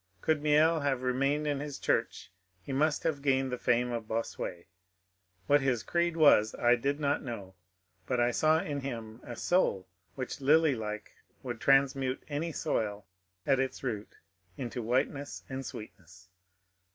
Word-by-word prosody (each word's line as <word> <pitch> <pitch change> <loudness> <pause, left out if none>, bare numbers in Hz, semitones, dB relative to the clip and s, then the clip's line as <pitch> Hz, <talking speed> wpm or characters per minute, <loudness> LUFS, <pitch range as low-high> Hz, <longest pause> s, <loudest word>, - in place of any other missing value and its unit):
Could 155 -2 +2
Miel 155 +2 +4
have 135 -3 -1
remained 135 +4 +1
in 145 -2 0
his 145 -1 -5
church - - -1 0.3
he 135 - -5
must 150 +2 +1
have 155 -4 -1
gained 135 -2 +1
the 125 - -2
fame 120 +1 +1
of 115 -2 -4
Bossuet; 110 -6 -4 0.8
what 145 0 +4
his 130 -4 0
creed 170 -1 0
was 125 -9 +5
I 120 0 +4
did 140 +4 -1
not 145 -1 +1
know, 105 -7 -7 0.5
but 125 -2 0
I 120 0 +3
saw 155 +5 +3
in 145 -2 -3
him 115 -4 -6
a 120 - -8
soul 110 - +1 0.3
which 130 +1 -5
lily 155 +2 +5
like 105 -2 -5 0.3
would 120 -3 -5
transmute 135 -1 +2
any 155 +3 -2
soil 105 -10 -2 0.4
at 135 -1 +3
its 135 0 -2
root 110 -5 -4 0.4
into 120 -1 -4
whiteness 135 +4 -1
and 135 0 -5
sweetness. 90 -6 -11
135 Hz, 155 wpm, -30 LUFS, 115-145 Hz, 0.8 s, was